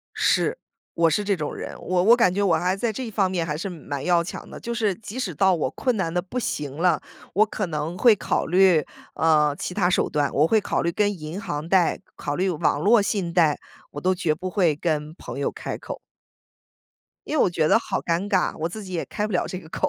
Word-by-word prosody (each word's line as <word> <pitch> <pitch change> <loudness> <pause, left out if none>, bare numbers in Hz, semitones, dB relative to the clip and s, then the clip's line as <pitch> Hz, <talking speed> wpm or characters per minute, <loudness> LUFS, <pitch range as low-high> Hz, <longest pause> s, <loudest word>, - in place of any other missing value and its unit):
是， - - +2 0.4
我 165 -1 +3
是 210 - +1
这 200 -1 +1
种 150 -3 -4
人， - - -6
我 180 0 0
我 230 +5 +6
感 205 -7 +3
觉 205 - 0
我 180 -5 +3
还 180 +3 0
在 225 +3 -1
这 235 +2 -5
方 195 -3 +1
面 175 -3 -1
还 150 -2 -2
是 180 +6 -4
蛮 145 -6 -6
要 175 -1 +3
强 170 - -8
的， - - -9
就 235 - -5
是 215 -4 +1
即 220 +5 -9
使 200 -10 -3
到 190 +4 +3
我 150 -6 -1
困 250 - -1
难 175 -5 -1
得 180 - +1
不 195 +7 -5
行 145 - -3
了。 170 -3 +3 0.3
我 210 +4 +5
可 210 -1 -3
能 155 +1 -3
会 235 +2 +6
考 - - -1
虑， 180 -2 +4 0.3
呃， 150 -2 +3
其 180 - -4
他 180 -3 +2
手 - - +2
段， 145 -1 0
我 150 +3 +3
会 220 +5 +3
考 - - -1
虑 170 - +1
跟 205 +1 0
银 155 +5 -6
行 150 -8 -4
贷， 180 -2 +3 0.2
考 145 - -3
虑 185 +2 +1
网 155 -3 0
络 215 +6 +5
信 195 -4 -1
贷， 165 -4 +3 0.3
我 145 - -6
都 185 +3 +2
绝 170 -4 0
不 185 +4 -5
会 180 -6 +2
跟 155 0 -2
朋 135 -6 -8
友 140 - 0
开 - - -5
口。 - - -7 1.3
因 310 - -2
为 - - +5
我 - - +4
觉 160 -3 +1
得 - - +5
好 - - -3
尴 170 +4 -1
尬， 190 -3 +1
我 160 +1 -1
自 215 +5 -7
己 190 -2 -9
也 170 - -2
开 210 - -2
不 215 - -6
了 180 - +1
这 185 - -5
个 160 - -13
口， 295 - -1
180 Hz, 265 characters per minute, -24 LUFS, 160-200 Hz, 1.3 s, 我